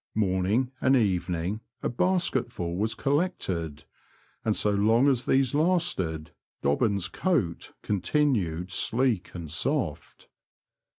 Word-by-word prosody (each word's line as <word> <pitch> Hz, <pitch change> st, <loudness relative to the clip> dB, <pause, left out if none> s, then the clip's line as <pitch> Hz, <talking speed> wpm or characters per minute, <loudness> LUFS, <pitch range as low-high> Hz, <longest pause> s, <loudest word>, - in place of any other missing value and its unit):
Morning 105 Hz, +5 st, +1 dB
and 130 Hz, 0 st, +4 dB
evening 95 Hz, -2 st, 0 dB, 0.2 s
a -, -, +1 dB
basketful 130 Hz, -, 0 dB
was 110 Hz, +4 st, 0 dB
col 140 Hz, +5 st, +1 dB
lected, 85 Hz, -, -3 dB, 0.6 s
and 110 Hz, -2 st, +1 dB
so 105 Hz, -, +2 dB
long 110 Hz, +6 st, +3 dB
as 130 Hz, -3 st, +2 dB
these 135 Hz, -1 st, +2 dB
lasted 145 Hz, -, 0 dB, 0.3 s
Dobbin's 95 Hz, +6 st, +1 dB
coat 120 Hz, -, -1 dB
continued 95 Hz, -, 0 dB
sleek 115 Hz, -6 st, 0 dB
and 85 Hz, -4 st, -6 dB
soft. 85 Hz, -, -2 dB
105 Hz, 110 wpm, -27 LUFS, 90-135 Hz, 0.6 s, and